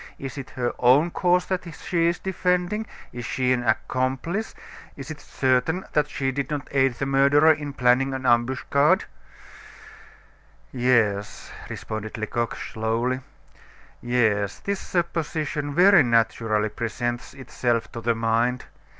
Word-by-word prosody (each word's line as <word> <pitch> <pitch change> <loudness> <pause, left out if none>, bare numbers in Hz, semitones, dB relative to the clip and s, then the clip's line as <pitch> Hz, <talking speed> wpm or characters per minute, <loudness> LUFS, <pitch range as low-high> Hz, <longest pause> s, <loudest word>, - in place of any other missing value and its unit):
Is 135 -2 -7
it 135 -2 -7
her 120 -2 -1
own 135 +8 +4
cause 180 0 +2
that 180 -2 -3
she 170 -2 0
is 170 +1 +1
defending? 185 +3 -1 0.3
Is 120 - -6
she 125 +1 0
an 125 - 0
accomplice? 130 - -1 0.4
Is 135 +1 -7
it 150 - -9
certain 130 +8 0
that 150 -1 +2
she 135 -2 -1
did 140 +1 -3
not 145 -2 -4
aid 135 -2 +2
the 135 - -3
murderer 140 +3 +5
in 145 -2 -6
planning 130 +1 +3
an 130 0 -5
ambuscade?" 130 +4 +2 1.7
"Yes," 115 -5 0 0.2
responded 110 0 -6
Lecoq, 115 +1 -2
slowly, 115 +3 -2 0.8
"yes; 110 -5 +1
this 200 -1 -3
supposition 155 -4 -2
very 190 0 +7
naturally 115 -3 +1
presents 120 +3 -4
itself 120 -4 -2
to 115 - -7
the 115 0 +1
mind. 115 +2 0
130 Hz, 130 wpm, -24 LUFS, 120-150 Hz, 1.7 s, very